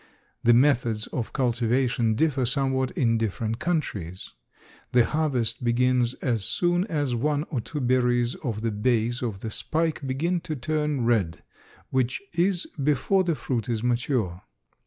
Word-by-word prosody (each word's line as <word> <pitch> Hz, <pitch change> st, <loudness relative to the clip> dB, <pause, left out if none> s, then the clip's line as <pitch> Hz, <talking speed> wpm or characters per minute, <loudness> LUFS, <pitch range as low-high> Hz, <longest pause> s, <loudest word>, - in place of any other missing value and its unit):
The 120 Hz, 0 st, +6 dB
methods 120 Hz, -5 st, +2 dB
of 120 Hz, -, -3 dB
cultivation 120 Hz, -2 st, +1 dB
differ 140 Hz, 0 st, +1 dB
somewhat 130 Hz, 0 st, +2 dB
in 115 Hz, -3 st, +2 dB
different 110 Hz, +1 st, -2 dB
countries. 105 Hz, -, -3 dB, 0.6 s
The 120 Hz, -2 st, +5 dB
harvest 125 Hz, -7 st, 0 dB
begins 125 Hz, +1 st, +2 dB
as 115 Hz, -6 st, -1 dB
soon 175 Hz, -, +1 dB
as 145 Hz, -, -1 dB
one 145 Hz, +5 st, 0 dB
or 130 Hz, -6 st, -1 dB
two 150 Hz, -, -5 dB
berries 125 Hz, -1 st, +2 dB
of 115 Hz, -7 st, -4 dB
the 115 Hz, 0 st, -1 dB
base 115 Hz, +2 st, 0 dB
of 110 Hz, -6 st, -3 dB
the 110 Hz, -, -4 dB
spike 160 Hz, +5 st, -1 dB
begin 165 Hz, +7 st, 0 dB
to 160 Hz, -2 st, -5 dB
turn 150 Hz, -1 st, -1 dB
red, 105 Hz, -9 st, +1 dB, 0.5 s
which 130 Hz, -1 st, 0 dB
is 175 Hz, +1 st, +1 dB, 0.2 s
before 150 Hz, +7 st, +2 dB
the 170 Hz, -3 st, 0 dB
fruit 120 Hz, -2 st, -3 dB
is 115 Hz, -1 st, -1 dB
mature. 120 Hz, -7 st, 0 dB
125 Hz, 145 wpm, -26 LUFS, 115-150 Hz, 0.6 s, The